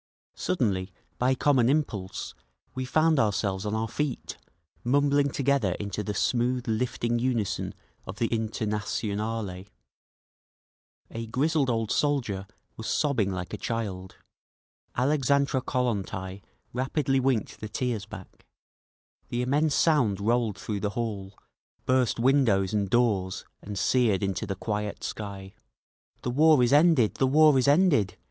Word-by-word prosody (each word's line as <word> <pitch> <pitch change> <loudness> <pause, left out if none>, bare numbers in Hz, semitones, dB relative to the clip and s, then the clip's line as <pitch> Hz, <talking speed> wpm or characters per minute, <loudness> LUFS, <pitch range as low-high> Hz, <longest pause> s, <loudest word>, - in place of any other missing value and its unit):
Suddenly, 100 - -1 0.3
by 130 +2 +2
common 130 -3 +3
impulse, 105 -11 -2 0.4
we 130 0 -3
found 155 +3 +3
ourselves 100 -2 0
on 105 - -1
our 110 +1 -1
feet, 135 +3 -3 0.5
mumbling 140 +2 +3
together 135 -8 +1
into 100 +2 -4
the 105 0 -4
smooth 125 +3 0
lifting 120 +1 -1
unison 120 -5 -1 0.3
of 95 - -6
the 120 - +1
Internationale. 105 -2 -2 1.5
A 115 0 -5
grizzled 140 +3 +1
old 115 -2 -1
soldier 120 -10 0 0.3
was 110 - -6
sobbing 130 -10 +1
like 90 -1 -5
a - - -4
child. 100 -5 -4 0.8
Alexandra 140 0 +2
Kollontai 100 -7 -2 0.3
rapidly 135 +2 0
winked 130 -4 0
the 110 - -6
tears 110 -3 -2
back. 105 -4 -12 0.8
The 120 +1 -1
immense 145 +4 +1
sound 125 - +3
rolled 115 0 +1
through 105 -2 -4
the 105 - -1
hall, 100 -4 -4 0.5
burst 130 -3 +2
windows 115 -7 +3
and 100 -2 0
doors 100 -6 +1 0.2
and 100 0 -7
seared 110 -1 +2
into 100 +2 -2
the 95 - -3
quiet 105 +1 -4
sky. 100 -2 -6 0.7
"The 125 - -1
war 150 0 +5
is 120 - +2
ended! 145 -7 +4
The 135 - +3
war 155 +2 +6
is 130 - +1
ended!" 145 - +3
115 Hz, 130 wpm, -27 LUFS, 100-135 Hz, 1.5 s, war